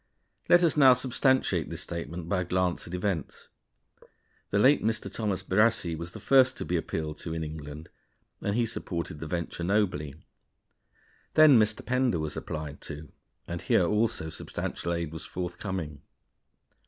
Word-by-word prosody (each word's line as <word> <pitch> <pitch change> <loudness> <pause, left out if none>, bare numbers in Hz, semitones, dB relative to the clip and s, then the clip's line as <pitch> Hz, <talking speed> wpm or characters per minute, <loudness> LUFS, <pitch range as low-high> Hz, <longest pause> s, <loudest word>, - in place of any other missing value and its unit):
Let 175 0 +7
us 165 - +3
now 135 -4 +8
substantiate 130 +1 +1
this - - -5
statement 85 0 -6
by 90 +1 +1
a - - 0
glance 90 0 -1
at 85 - -9
events. 90 -5 -3 1.0
The 100 - 0
late 135 +7 +5
Mr. 110 0 -1
Thomas 105 -4 -2
Brassey 100 -4 +2
was 85 +2 -7
the - - -8
first 130 -1 +4
to - - -4
be 90 - -1
appealed 80 -2 -3
to 80 -1 -5
in 80 - -2
England, 75 0 -8 0.5
and 100 - -1
he 120 0 +2
supported 85 -8 -4
the 80 - -6
venture 85 0 -3
nobly. 90 -7 0 1.2
Then 155 -6 +8
Mr. 110 0 +1
Pender 125 -5 +1
was 80 -2 -3
applied 75 -1 -6
to, 75 0 -8 0.4
and 85 0 -4
here 90 - +3
also 105 -5 0
substantial 85 - -4
aid 85 -2 -2
was 80 - -7
forthcoming. 90 -4 -5
90 Hz, 155 wpm, -28 LUFS, 80-110 Hz, 1.2 s, now